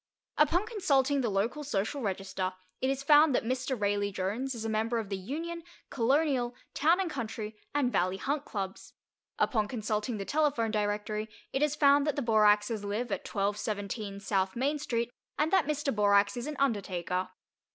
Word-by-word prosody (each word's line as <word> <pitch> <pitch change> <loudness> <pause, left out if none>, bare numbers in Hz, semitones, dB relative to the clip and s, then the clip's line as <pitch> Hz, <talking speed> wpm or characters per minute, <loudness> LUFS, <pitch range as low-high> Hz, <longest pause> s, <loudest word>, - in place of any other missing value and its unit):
Upon 335 +6 +4
consulting 285 - +2
the 240 - 0
local 220 +9 -1
social 270 +1 -2
register, 190 -2 -2 0.3
it 260 - +1
is 275 0 -1
found 295 -1 +6
that - - +1
Mr. 255 +1 -2
Raleigh 205 0 +1
Jones 210 +8 -2
is 225 -1 -5
a - - 0
member 225 +2 0
of 220 -3 -3
the 195 - -1
Union, 320 - -5 0.3
Colonial, 260 -1 +1 0.2
Town 330 +5 +3
and 380 - 0
Country, 220 -6 -5 0.2
and 270 -4 +2
Valley 185 -2 +1
Hunt 280 +8 -1
Clubs; 195 -6 -5 0.4
upon 215 -6 +1
consulting 215 0 -2
the 195 - -4
telephone 285 -6 +1
directory 210 0 -1 0.2
it 270 - 0
is 300 -1 +2
found 285 0 +5
that 295 - +1
the 285 - -1
Boraxes 210 -1 +3
live 210 +5 -2
at - - -3
1217 205 0 -2
S. 195 -1 -1
Main 280 +5 0
Street, 235 -4 -1 0.3
and 310 +4 +1
that 375 -6 +4
Mr. 295 -4 -1
Borax 200 -1 +4
is 240 +3 -4
an 300 - -4
undertaker. 185 -7 -1
230 Hz, 170 wpm, -30 LUFS, 205-280 Hz, 0.4 s, found